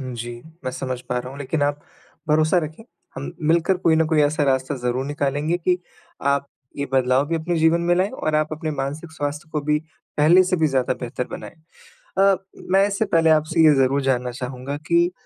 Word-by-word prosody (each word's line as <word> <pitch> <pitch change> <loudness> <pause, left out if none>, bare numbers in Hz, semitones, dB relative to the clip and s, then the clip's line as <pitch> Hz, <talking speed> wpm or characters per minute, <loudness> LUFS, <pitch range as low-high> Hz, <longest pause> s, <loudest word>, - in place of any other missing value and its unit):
जी, 120 -2 -6 0.2
मैं 130 - -1
समझ 130 -1 -4
पा 125 - 0
रहा 125 +1 -6
हूँ 140 - -10
लेकिन 145 +2 -2
आप 145 0 0 0.5
भरोसा 155 +3 +3
रखें, 155 +9 -9 0.3
हम 135 +1 -5 0.2
मिलकर 170 +3 +3
कोई 165 -3 +3
ना 160 - +3
कोई 155 - +4
ऐसा 150 +1 +1
रास्ता 130 +1 +1
ज़रूर 125 +1 -1
निकालेंगे 145 +3 -1
कि 180 +1 +1 0.6
आप 140 0 -3 0.3
ये 140 - -2
बदलाव 130 +1 +3
भी 165 - 0
अपने 170 +2 -2
जीवन 160 +1 +4
में 175 - +5
लाएँ 185 +3 +1
और 155 -12 -2
आप 155 0 +2
अपने 155 0 -3
मानसिक 145 +3 -4
स्वास्थ्य 150 +2 -4
को 150 - 0
भी 150 +1 +2 0.4
पहले 165 +5 +6
से 185 0 +1
भी 160 - +3
ज़्यादा 130 -3 +1
बेहतर 125 0 -4
बनाएँ। - - -7 0.7
अ, 195 0 +5 0.4
मैं 195 +1 +5
इससे 205 +2 -1
पहले 165 -3 +3
आपसे 155 +1 +3
ये 155 - +7
ज़रूर 135 +1 +2
जानना 125 -2 0
चाहूँगा 130 +2 -5
कि 170 +1 +3
150 Hz, 200 wpm, -22 LUFS, 135-165 Hz, 0.7 s, ये